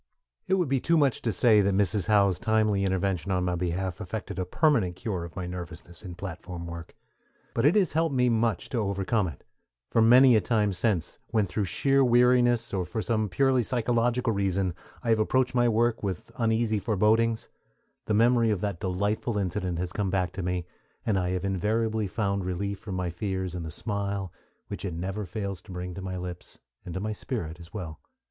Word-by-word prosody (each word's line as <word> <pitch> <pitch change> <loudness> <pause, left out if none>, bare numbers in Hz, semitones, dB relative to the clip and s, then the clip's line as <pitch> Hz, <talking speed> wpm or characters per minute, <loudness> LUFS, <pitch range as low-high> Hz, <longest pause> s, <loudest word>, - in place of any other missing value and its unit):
It 190 - +3
would 180 -4 +1
be 135 0 +1
too 165 +6 +2
much 140 -5 +2
to 115 - 0
say 110 0 +5
that 100 -1 +1
Mrs. 100 0 +2
Howe's 100 -4 +3
timely 110 -3 +2
intervention 95 -2 0
on 90 -1 +1
my 90 - 0
behalf 90 +2 -2
effected 105 0 -5
a 90 - -1
permanent 115 - +2
cure 95 -2 -3
of 85 -1 -9
my 95 - -4
nervousness 85 -1 -8
in 90 -4 -8
platform 90 -1 -7
work; 85 0 -8 0.6
but - - +3
it 160 - +4
has 200 -4 +3
helped 160 -2 +1
me 125 -1 +3
much 115 -4 +1
to 125 - -1
overcome 100 0 0
it; 75 -6 -9 0.5
for 115 - +3
many 125 +2 +7
a 110 - +4
time 105 -4 +1
since, 90 -3 -1
when 110 -3 +1
through 100 +2 -2
sheer 135 +8 +2
weariness, 120 -2 +4
or 95 -2 0
for 110 +5 -4
some 110 -3 0
purely 130 +6 +3
psychological 120 0 +1
reason, 95 -2 0 0.3
I 120 - -2
have 110 - +3
approached 125 +4 +1
my 120 -1 +3
work 115 +1 +1
with 95 -4 -4
uneasy 110 -2 +1
forebodings, 110 +2 +2 0.6
the 105 - 0
memory 115 +1 +4
of 105 -4 0
that 100 -5 -2
delightful 100 +4 -1
incident 90 -2 -2
has 90 +1 -3
come 100 -2 -1
back 90 -1 0
to - - -5
me, 90 -1 -2 0.4
and 100 -4 +2
I 90 -1 -1
have 90 +1 -2
invariably 110 +3 0
found 100 -1 -1
relief 95 +2 -3
from 100 -3 -6
my 90 -2 -2
fears 95 0 -3
in 90 - -4
the 80 - -5
smile 100 0 -3 0.3
which - - -6
it 90 -4 -3
never 95 +4 -4
fails 100 0 -4
to 95 - -13
bring 90 0 -5
to 95 - -7
my 95 -1 -4
lips, 90 -1 -7 0.3
and 90 - -6
to - - -1
my 105 +2 -2
spirit 90 -8 -5
as 85 0 -12
well. 85 -7 -6
100 Hz, 200 wpm, -27 LUFS, 90-115 Hz, 0.6 s, many